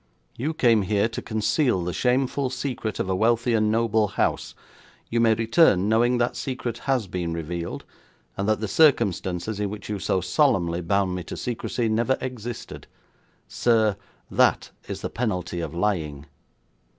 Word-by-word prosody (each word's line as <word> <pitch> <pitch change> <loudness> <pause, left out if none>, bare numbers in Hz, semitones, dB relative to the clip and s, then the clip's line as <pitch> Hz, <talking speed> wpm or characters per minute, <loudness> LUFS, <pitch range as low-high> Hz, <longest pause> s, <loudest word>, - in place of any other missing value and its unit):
You 150 +6 -3
came 115 -7 +4
here 100 +2 +1
to 115 - -5
conceal 110 - +1
the 90 0 -3
shameful 130 +2 +1
secret 125 -4 -4
of - - -1
a 95 - 0
wealthy 115 +4 +2
and 110 -1 +2
noble 110 -1 +2
house; 100 - -1 0.6
you 115 - +1
may 115 -1 +4
return 115 - +3
knowing 120 +3 +3
that 120 0 0
secret 125 -3 -4
has 130 -5 +2
been 90 -2 -3
revealed, 85 +1 -5 0.5
and 100 +2 -1
that 110 0 +1
the 110 - -1
circumstances 100 - +2
in 105 -1 -1
which 105 +1 -8
you 105 -1 -2
so 95 - 0
solemnly 85 -1 +1
bound 95 +2 +1
me 90 -1 -4
to - - -7
secrecy 120 0 -2
never 115 +4 +1
existed. 120 -2 -7 0.6
Sir, 110 -4 +2 0.4
that - - +2 0.2
is - - -5
the - - -3
penalty 90 -7 -2
of 80 -1 -5
lying.' 80 -7 -1
110 Hz, 160 wpm, -24 LUFS, 95-120 Hz, 0.6 s, came